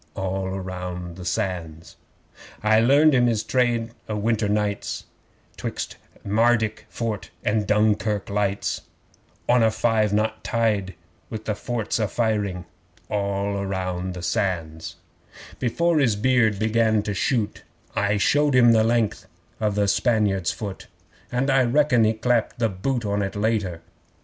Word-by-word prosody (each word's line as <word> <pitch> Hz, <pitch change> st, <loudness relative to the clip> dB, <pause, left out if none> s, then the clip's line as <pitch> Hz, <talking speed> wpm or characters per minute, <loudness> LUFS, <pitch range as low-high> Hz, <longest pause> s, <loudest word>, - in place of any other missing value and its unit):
(All 95 Hz, 0 st, -2 dB
round 90 Hz, -2 st, -6 dB
the 90 Hz, -1 st, -9 dB
Sands!) 85 Hz, -4 st, -3 dB, 0.7 s
'I 110 Hz, +1 st, +5 dB
learned 140 Hz, +6 st, +5 dB
him 125 Hz, -2 st, +4 dB
his 110 Hz, -2 st, +1 dB
trade 120 Hz, -3 st, +1 dB, 0.2 s
o' 105 Hz, -, -1 dB
winter 105 Hz, 0 st, 0 dB
nights, 105 Hz, -1 st, -1 dB, 0.5 s
'Twixt -, -, -5 dB, 0.3 s
Mardyk 110 Hz, +1 st, +1 dB
Fort 110 Hz, -4 st, -4 dB, 0.2 s
and 105 Hz, -1 st, +1 dB
Dunkirk 105 Hz, -1 st, +1 dB
lights 100 Hz, -1 st, -1 dB, 0.7 s
On 125 Hz, 0 st, +4 dB
a 110 Hz, -, +5 dB
five 110 Hz, -1 st, +1 dB
knot 110 Hz, +1 st, 0 dB
tide 105 Hz, -5 st, 0 dB, 0.3 s
with 110 Hz, -1 st, -6 dB
the 105 Hz, -, 0 dB
forts 115 Hz, +1 st, -2 dB
a 110 Hz, -, +1 dB
firing. 100 Hz, -5 st, -1 dB, 0.5 s
(All 100 Hz, -1 st, -1 dB
round 95 Hz, -1 st, -3 dB
the 90 Hz, -, -7 dB
Sands!) 80 Hz, -4 st, -2 dB, 0.6 s
'Before 160 Hz, +7 st, +1 dB
his 120 Hz, -7 st, +3 dB
beard 110 Hz, -1 st, +2 dB
began 110 Hz, 0 st, +2 dB
to 105 Hz, -, -2 dB
shoot, 110 Hz, +2 st, -1 dB, 0.3 s
I 105 Hz, 0 st, +1 dB
showed 145 Hz, +6 st, +3 dB
him 120 Hz, -2 st, +7 dB
the 110 Hz, -1 st, +4 dB
length 115 Hz, -1 st, 0 dB, 0.3 s
of 105 Hz, -2 st, 0 dB
the 105 Hz, -1 st, +2 dB
Spaniard's 100 Hz, -5 st, +2 dB
foot 100 Hz, -3 st, -6 dB, 0.4 s
And 135 Hz, +3 st, +1 dB
I 135 Hz, 0 st, +4 dB
reckon 125 Hz, -2 st, +3 dB
he 110 Hz, -, +3 dB
clapped 115 Hz, +1 st, 0 dB
the 115 Hz, -2 st, +1 dB
boot 115 Hz, +5 st, -2 dB
on 100 Hz, 0 st, 0 dB
it 100 Hz, 0 st, -3 dB
later. 100 Hz, -5 st, -1 dB
105 Hz, 140 wpm, -24 LUFS, 100-115 Hz, 0.7 s, him